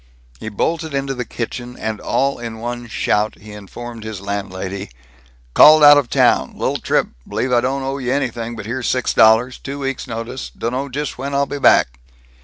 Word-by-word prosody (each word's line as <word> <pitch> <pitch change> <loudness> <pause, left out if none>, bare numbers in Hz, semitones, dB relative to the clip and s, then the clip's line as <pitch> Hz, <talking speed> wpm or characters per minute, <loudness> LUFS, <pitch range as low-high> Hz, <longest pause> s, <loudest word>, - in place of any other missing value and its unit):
He 110 - -5
bolted 160 +8 -2
into 135 0 -1
the 125 -2 -4
kitchen 120 +1 -6
and 110 -1 -4
all 140 -1 0
in 115 -2 -6
one 120 +1 -5
shout 105 -1 0
he 105 0 -12
informed 110 +3 -9
his 110 -3 -6
landlady, 100 -1 -5 0.6
"Called 155 0 +8
out 145 0 +10
of 130 -4 -4
town, - - +2
li'l - - -1
trip, - - 0 0.2
b'lieve 130 0 -2
I 120 - +4
don't 135 +2 -1
owe 135 +1 -3
you 125 -1 -2
an'thing, 120 -4 -2
here's 120 +4 -3
six 130 -1 0
dollars, 115 +3 +4
two 140 +2 -6
weeks' 135 -1 -4
notice, 115 +3 -5
dunno 130 +4 -3
just 145 0 -4
when 140 +1 -3
I 140 0 +2
be 145 - -5
back." - - +4
120 Hz, 185 wpm, -19 LUFS, 110-135 Hz, 0.6 s, out